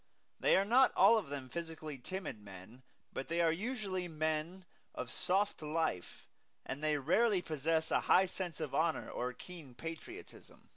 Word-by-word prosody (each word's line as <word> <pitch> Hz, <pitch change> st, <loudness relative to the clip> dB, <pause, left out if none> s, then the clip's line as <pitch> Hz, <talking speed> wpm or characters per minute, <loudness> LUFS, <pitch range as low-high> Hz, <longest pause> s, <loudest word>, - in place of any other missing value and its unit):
They -, -, +5 dB
are 195 Hz, -, +3 dB
not 250 Hz, +5 st, +5 dB
all 220 Hz, +4 st, +7 dB
of 190 Hz, -, -8 dB
them 140 Hz, -2 st, -5 dB
physically 160 Hz, -2 st, -6 dB
timid 185 Hz, -, -5 dB
men; 100 Hz, +5 st, -12 dB, 0.3 s
but 135 Hz, -, -4 dB
they 170 Hz, +1 st, -1 dB
are 165 Hz, -1 st, +4 dB
usually 195 Hz, -1 st, -3 dB
men 160 Hz, +3 st, -2 dB, 0.3 s
of 125 Hz, -1 st, -5 dB
soft 195 Hz, +1 st, +1 dB
life; 155 Hz, -, -2 dB, 0.4 s
and 140 Hz, +3 st, -5 dB
they 155 Hz, -1 st, +2 dB
rarely 185 Hz, -, +3 dB
possess 160 Hz, +1 st, 0 dB
a -, -, +4 dB
high 190 Hz, -, +5 dB
sense 180 Hz, -3 st, -5 dB
of 155 Hz, -4 st, -4 dB
honor 160 Hz, 0 st, +1 dB
or 125 Hz, -, -2 dB
a 125 Hz, -, -9 dB
keen 155 Hz, -5 st, -11 dB
patriotism. 165 Hz, -, -9 dB
165 Hz, 165 wpm, -35 LUFS, 145-185 Hz, 0.4 s, all